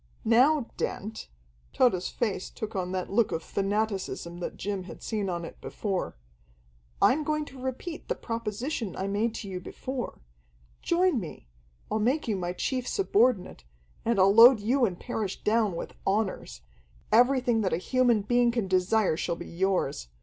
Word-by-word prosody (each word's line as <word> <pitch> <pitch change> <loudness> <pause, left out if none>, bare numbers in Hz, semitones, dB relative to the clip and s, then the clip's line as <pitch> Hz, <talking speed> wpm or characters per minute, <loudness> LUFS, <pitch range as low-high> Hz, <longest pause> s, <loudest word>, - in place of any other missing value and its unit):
"Now, 255 +5 +4
Dent" 220 +3 -4 0.5
Tode's 185 -8 +2
face 210 -6 -2
took 220 0 -6
on 180 -1 -2
that 185 0 -3
look 220 +2 +2
of 165 - -2
fanaticism 195 -4 -2
that 175 - -5
Jim 195 -1 -3
had - - -10
seen 210 -4 -2
on 170 -1 -3
it - - -11
before 195 - -3 0.8
"I'm 300 +4 +4
going 305 0 -1
to 265 -2 -12
repeat 265 +6 -5
the - - -1
proposition 230 - -4
I 190 - -3
made 215 +3 0
to 205 - -6
you 185 -2 -4
before. 255 +7 -6 0.6
Join 350 -5 +2
me. 160 - -9 0.4
I'll 215 - +1
make 255 +8 +1
you 215 - +1
my 175 -2 -2
chief 255 +6 -2
subordinate, 225 - +1 0.4
and 230 -1 +1
I'll 195 +1 +6
load 235 +2 +9
you 240 +5 +2
and 180 -5 -3
Parrish 220 -6 -4
down 215 -3 +2
with - - -6
honors. 195 - -1 0.5
Everything 245 -1 +4
that 190 - 0
a - - +1
human 240 +2 +2
being 240 +3 +3
can 235 -4 -1
desire 185 0 +2
shall 170 - -2
be 170 - -8
yours. 180 - -1
215 Hz, 165 wpm, -28 LUFS, 190-245 Hz, 0.8 s, load